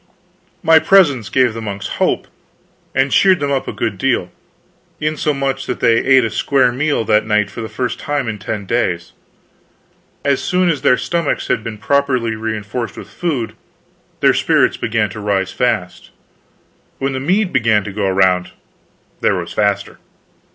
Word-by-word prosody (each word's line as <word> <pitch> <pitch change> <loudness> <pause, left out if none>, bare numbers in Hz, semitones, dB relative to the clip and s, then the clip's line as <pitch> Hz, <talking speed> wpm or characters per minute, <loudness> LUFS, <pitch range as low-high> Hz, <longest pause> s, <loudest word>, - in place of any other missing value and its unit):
My 160 -1 +6
presence 145 - +4
gave 130 -3 +2
the 115 - -6
monks 100 -2 -5
hope, - - 0 0.7
and 135 +1 +2
cheered 190 -2 +4
them 140 0 -1
up 135 -1 -1
a - - -2
good - - -3
deal; - - 0 0.7
insomuch 140 -3 -1
that - - -3
they 115 -1 +4
ate 130 -1 +4
a 110 - -3
square 130 -3 +2
meal 140 -2 0
that 105 +1 +2
night 105 -2 +1
for 115 - -7
the 110 - -5
first 125 -1 -3
time 145 -4 -2
in 110 -2 -4
ten 100 +1 -4
days. 90 -6 -1 1.1
As 140 -1 +2
soon 180 -1 +1
as 150 - -3
their 125 - +4
stomachs 170 -3 -2
had 110 - 0
been 115 -2 -6
properly 125 -1 0
reinforced 110 +1 -4
with - - -10
food, 140 -10 -2 0.7
their - - +5
spirits - - +2
began 110 -3 -1
to 110 - -8
rise 100 -2 -1
fast; 110 -8 -2 0.9
when 135 0 -2
the 130 - -2
mead 185 +8 0
began 115 -5 +3
to 100 - -7
go 100 -1 0
round 95 -1 +2 0.7
they - - +2
rose - - -2
faster. 100 -1 -1
120 Hz, 165 wpm, -17 LUFS, 105-140 Hz, 1.1 s, My